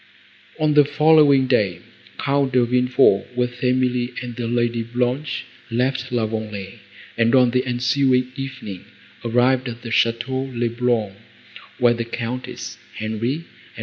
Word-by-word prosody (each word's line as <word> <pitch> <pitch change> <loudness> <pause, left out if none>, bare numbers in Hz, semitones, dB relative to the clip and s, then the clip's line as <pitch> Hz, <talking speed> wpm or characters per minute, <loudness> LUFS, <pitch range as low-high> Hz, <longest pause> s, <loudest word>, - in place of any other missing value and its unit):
On 155 -1 +2
the 150 0 +7
following 145 -2 +5
day, 105 -9 +1 0.4
Count 140 -1 0
De 125 -1 +4
Villefort, 125 -5 +3
with 125 0 -2
Emily 125 -1 +1
and 120 -1 -7
the 120 -1 -3
Lady 120 0 0
Blanche, 125 +6 -2 0.2
left 125 +2 -1
La 120 -3 +1
Vallée, 110 -1 -5 0.4
and, 115 +2 +4
on 125 -2 +5
the 125 +1 +1
ensuing 125 +1 +1
evening, 130 -9 -7 0.4
arrived 125 +2 +2
at 120 0 -9
the 115 - -6
Château 130 +4 0
le 120 0 +1
Blanc, 120 -4 0 0.6
where 120 -1 +4
the 115 0 -3
Countess, 120 +2 -6 0.2
Henri, 110 +4 -2
and 165 +2 -14
M. - - -9
125 Hz, 145 wpm, -21 LUFS, 115-130 Hz, 0.6 s, the